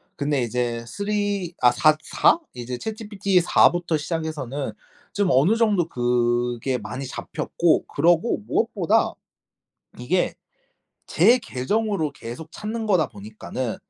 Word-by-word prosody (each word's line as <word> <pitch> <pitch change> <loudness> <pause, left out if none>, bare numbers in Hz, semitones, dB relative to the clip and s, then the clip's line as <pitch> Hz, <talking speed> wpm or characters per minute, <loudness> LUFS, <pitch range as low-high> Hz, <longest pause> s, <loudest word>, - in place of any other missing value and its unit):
근데 145 -2 0
이제 120 0 -2
3 205 -3 -1
아 125 -1 +6
사 155 -1 +4
4? - - +3
이제 125 0 -5
ChatGPT 205 -4 0
4 170 - +5
부터 175 -2 -1
시작해서는 145 -5 -4 0.4
좀 205 -1 +1
어느 155 - +4
정도 210 -7 +2
그게 120 0 0
많이 125 +6 -6
잡혔고 165 +5 0
그러고 170 +8 +2
무엇보다 430 +8 +1 0.9
이게 - - 0 0.7
제 245 +2 +5
계정으로 200 - -1
계속 145 +6 -9
찾는 220 +1 -4
거다 180 -9 +2
보니까는 110 +3 -6
155 Hz, 250 characters per minute, -23 LUFS, 125-200 Hz, 0.9 s, 아